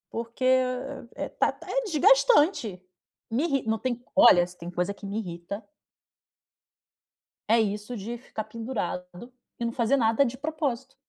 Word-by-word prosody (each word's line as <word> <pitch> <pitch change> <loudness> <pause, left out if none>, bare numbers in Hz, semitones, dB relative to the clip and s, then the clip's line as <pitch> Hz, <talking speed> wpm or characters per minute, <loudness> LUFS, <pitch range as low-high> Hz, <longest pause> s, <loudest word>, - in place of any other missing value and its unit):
Porque, 235 +2 -5
eh 255 0 +1 0.2
eh, - - -4
tá - - +5 0.2
é - - -1
desgastante 380 - +4 0.6
me 270 +8 +1
irri 275 -5 0
não 220 0 0
tem 245 0 -2 0.2
olha 215 -11 +7
se 180 - -13
tem 175 0 -8
coisa 180 +3 -1
que 200 0 -10
me 200 - -4
irrita 185 +1 -5 1.9
é 230 +1 +5
isso 210 +3 -3
de 230 +5 -5
ficar 220 -3 -6
pendurado 220 -2 -5 0.3
e 235 - -1
não 230 - -1
fazer 245 +3 +2
nada 225 +3 +3
de 255 0 -4
propósito. 275 -4 -3
235 Hz, 150 wpm, -27 LUFS, 210-265 Hz, 1.9 s, olha